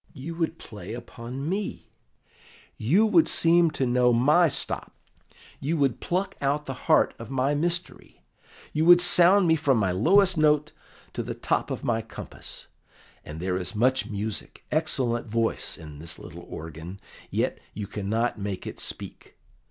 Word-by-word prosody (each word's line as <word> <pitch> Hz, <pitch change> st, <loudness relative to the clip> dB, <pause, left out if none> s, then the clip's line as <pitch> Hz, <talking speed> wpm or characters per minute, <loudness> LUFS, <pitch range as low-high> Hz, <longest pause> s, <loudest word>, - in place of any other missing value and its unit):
"You 150 Hz, +6 st, -7 dB
would 165 Hz, -1 st, -2 dB
play 110 Hz, 0 st, -8 dB
upon 120 Hz, +3 st, -7 dB
me; 195 Hz, +3 st, -4 dB, 0.8 s
you 170 Hz, -, +3 dB
would 315 Hz, +9 st, +4 dB
seem 170 Hz, 0 st, +4 dB
to 140 Hz, -3 st, -1 dB
know 125 Hz, 0 st, +3 dB
my 150 Hz, +9 st, +4 dB
stops; 140 Hz, -, -2 dB, 0.7 s
you 160 Hz, +5 st, -1 dB
would 135 Hz, -5 st, +1 dB
pluck 185 Hz, +3 st, -2 dB
out 145 Hz, +2 st, 0 dB
the 135 Hz, -, -4 dB, 0.2 s
heart 155 Hz, -, +5 dB
of 115 Hz, -, -8 dB
my 135 Hz, +2 st, +1 dB
mystery; 170 Hz, +4 st, -3 dB, 0.5 s
you 155 Hz, -, +1 dB
would 175 Hz, 0 st, +8 dB
sound 180 Hz, +2 st, +6 dB
me 160 Hz, -, +5 dB
from 145 Hz, -5 st, +2 dB
my 100 Hz, -4 st, +1 dB
lowest 180 Hz, -, +4 dB
note 150 Hz, -1 st, +3 dB, 0.4 s
to -, -, -3 dB
the -, -, -5 dB
top -, -, -1 dB
of -, -, -4 dB
my 115 Hz, -1 st, 0 dB
compass; 110 Hz, 0 st, -10 dB, 0.6 s
and 75 Hz, +1 st, -8 dB
there 90 Hz, +1 st, -1 dB
is 95 Hz, +4 st, -4 dB
much 125 Hz, 0 st, +2 dB
music, 105 Hz, -1 st, -5 dB
excellent 130 Hz, -7 st, 0 dB
voice 115 Hz, +1 st, -1 dB
in 75 Hz, -2 st, -11 dB
this 80 Hz, +2 st, -5 dB
little -, -, -11 dB
organ, 80 Hz, +4 st, -8 dB, 0.3 s
yet -, -, -1 dB, 0.2 s
you 105 Hz, -, -4 dB
cannot 110 Hz, +4 st, -2 dB
make 100 Hz, -2 st, -4 dB
it -, -, -7 dB
speak. -, -, -6 dB
130 Hz, 160 wpm, -26 LUFS, 110-165 Hz, 0.8 s, would